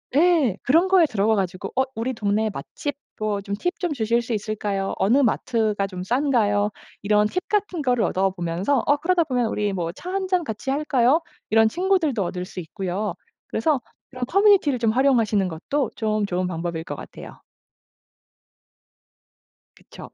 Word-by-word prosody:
예 300 Hz, -, +4 dB
그런 330 Hz, +8 st, +3 dB
거에 370 Hz, -3 st, +6 dB
들어가 220 Hz, -3 st, +1 dB
가지고 185 Hz, -2 st, -3 dB
"어 265 Hz, -, +5 dB
우리 235 Hz, +4 st, -2 dB
동네 215 Hz, 0 st, 0 dB
맛집 255 Hz, -, -5 dB, 0.2 s
뭐 215 Hz, -1 st, -1 dB
좀 200 Hz, 0 st, -4 dB
팁 355 Hz, -, -3 dB
좀 350 Hz, -5 st, -1 dB
주실 235 Hz, -1 st, +1 dB
수 235 Hz, 0 st, -4 dB
있을까요? 205 Hz, -2 st, -2 dB
어느 225 Hz, +9 st, +3 dB
마트가 220 Hz, -5 st, +1 dB
좀 185 Hz, -2 st, -6 dB
싼가요?" 215 Hz, -4 st, +2 dB, 0.3 s
이런 210 Hz, +1 st, +3 dB
팁 365 Hz, -, -4 dB
같은 395 Hz, -5 st, -1 dB
거를 250 Hz, -4 st, +1 dB
얻어 190 Hz, 0 st, +1 dB
보면서 180 Hz, +9 st, 0 dB
어 290 Hz, +1 st, +4 dB
그러다 340 Hz, +2 st, +2 dB
보면 250 Hz, -5 st, 0 dB
"우리 210 Hz, -2 st, -1 dB
뭐 175 Hz, -3 st, -2 dB
차 360 Hz, -, -8 dB
1 385 Hz, -1 st, -1 dB
잔 365 Hz, -2 st, +1 dB
같이 225 Hz, +1 st, -5 dB
할까요?" 280 Hz, +1 st, +2 dB, 0.3 s
이런 225 Hz, 0 st, +5 dB
친구들도 350 Hz, -, +1 dB
얻을 180 Hz, +1 st, -4 dB
수 185 Hz, -, -8 dB
있고요. 190 Hz, +4 st, -3 dB, 0.3 s
그래서 305 Hz, -4 st, +1 dB, 0.3 s
그런 250 Hz, -2 st, -4 dB
커뮤니티를 390 Hz, -, +4 dB
좀 230 Hz, -2 st, +2 dB
활용하시는 225 Hz, -6 st, +2 dB
것도 240 Hz, -, -2 dB
좀 215 Hz, -1 st, 0 dB
좋은 185 Hz, -1 st, -1 dB
방법일 165 Hz, -1 st, -4 dB
것 145 Hz, -, -6 dB
같아요. -, -, -11 dB, 2.4 s
그쵸. -, -, -13 dB
225 Hz, 320 characters per minute, -23 LUFS, 200-290 Hz, 2.4 s, 거에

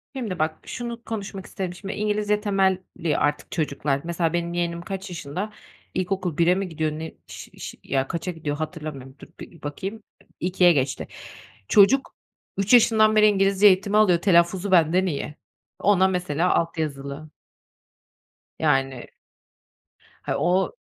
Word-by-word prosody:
Şimdi 215 Hz, -10 st, -4 dB
bak, 155 Hz, 0 st, -1 dB
şunu 235 Hz, -1 st, -6 dB
konuşmak 200 Hz, -3 st, -6 dB
isterim 185 Hz, -2 st, -5 dB
şimdi. 195 Hz, +2 st, -6 dB
İngilizce 210 Hz, 0 st, 0 dB
temelli 190 Hz, -5 st, 0 dB
artık 145 Hz, 0 st, -1 dB
çocuklar, 140 Hz, -3 st, -1 dB
mesela 170 Hz, -1 st, -1 dB
benim 170 Hz, 0 st, -1 dB
yeğenim 170 Hz, -1 st, -2 dB
kaç 195 Hz, +2 st, -6 dB
yaşında? 180 Hz, +5 st, -5 dB, 0.4 s
İlkokul 185 Hz, -3 st, -2 dB
1'e 175 Hz, +2 st, +4 dB
mi 195 Hz, -1 st, -3 dB
gidiyor 155 Hz, -1 st, -1 dB
ne? 160 Hz, +1 st, -6 dB
Ş -, -, -10 dB
ş -, -, -7 dB
ya 135 Hz, -1 st, -1 dB
kaça 170 Hz, +4 st, -3 dB
gidiyor 155 Hz, -3 st, -4 dB
hatırlamıyorum. 150 Hz, -5 st, -6 dB
Dur -, -, -12 dB
bir 165 Hz, -, -12 dB
bakayım. 195 Hz, +9 st, -6 dB, 0.4 s
2'e 180 Hz, 0 st, +4 dB
geçti. 135 Hz, -3 st, -1 dB, 0.6 s
Çocuk, 210 Hz, -, +4 dB, 0.4 s
3 200 Hz, +5 st, +1 dB
yaşından 220 Hz, -2 st, +6 dB
beri 215 Hz, 0 st, +6 dB
İngilizce 195 Hz, 0 st, +4 dB
eğitimi 200 Hz, +2 st, +3 dB
alıyor, 180 Hz, -5 st, +4 dB
telaffuzu 180 Hz, +1 st, +3 dB
benden 180 Hz, +1 st, +4 dB
iyi. 150 Hz, -3 st, -3 dB, 0.4 s
Ona 190 Hz, -2 st, +4 dB
mesela 180 Hz, -2 st, 0 dB
alt 165 Hz, 0 st, -1 dB
yazılı 140 Hz, 0 st, -4 dB, 1.3 s
Yani. 135 Hz, -4 st, 0 dB, 1.1 s
Ha, -, -, -2 dB
o 180 Hz, +5 st, +1 dB
180 Hz, 140 wpm, -24 LUFS, 155-195 Hz, 1.3 s, yaşından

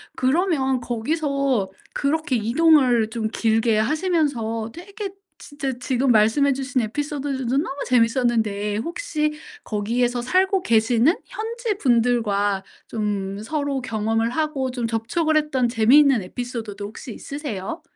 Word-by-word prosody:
그러면 265 Hz, -2 st, +1 dB
거기서 270 Hz, -2 st, -1 dB, 0.2 s
그렇게 290 Hz, -2 st, 0 dB
이동을 245 Hz, -1 st, +4 dB
좀 220 Hz, -1 st, -2 dB
길게 225 Hz, 0 st, +1 dB
하시면서 250 Hz, -, 0 dB
되게 400 Hz, +3 st, -7 dB, 0.3 s
진짜 275 Hz, -3 st, -5 dB
지금 255 Hz, 0 st, +1 dB
말씀해 225 Hz, +6 st, +4 dB
주신 265 Hz, 0 st, -2 dB
에피소드들도 270 Hz, +1 st, -2 dB
너무 285 Hz, -2 st, -1 dB
재밌었는데 230 Hz, -4 st, +1 dB
혹시 305 Hz, -, -2 dB, 0.3 s
거기에서 240 Hz, +3 st, 0 dB
살고 375 Hz, +8 st, +2 dB
계시는 230 Hz, -, +3 dB
현지분들과 245 Hz, -, 0 dB, 0.2 s
좀 200 Hz, -2 st, -3 dB
서로 285 Hz, 0 st, -2 dB
경험을 225 Hz, -1 st, 0 dB
하고 275 Hz, -2 st, -1 dB
좀 240 Hz, -2 st, -2 dB
접촉을 275 Hz, +8 st, 0 dB
했던 270 Hz, -5 st, +1 dB
재미있는 250 Hz, +2 st, +5 dB
에피소드도 220 Hz, -1 st, -6 dB
혹시 220 Hz, +4 st, -8 dB
있으세요? 280 Hz, -, -6 dB
250 Hz, 295 characters per minute, -23 LUFS, 225-295 Hz, 0.3 s, 재미있는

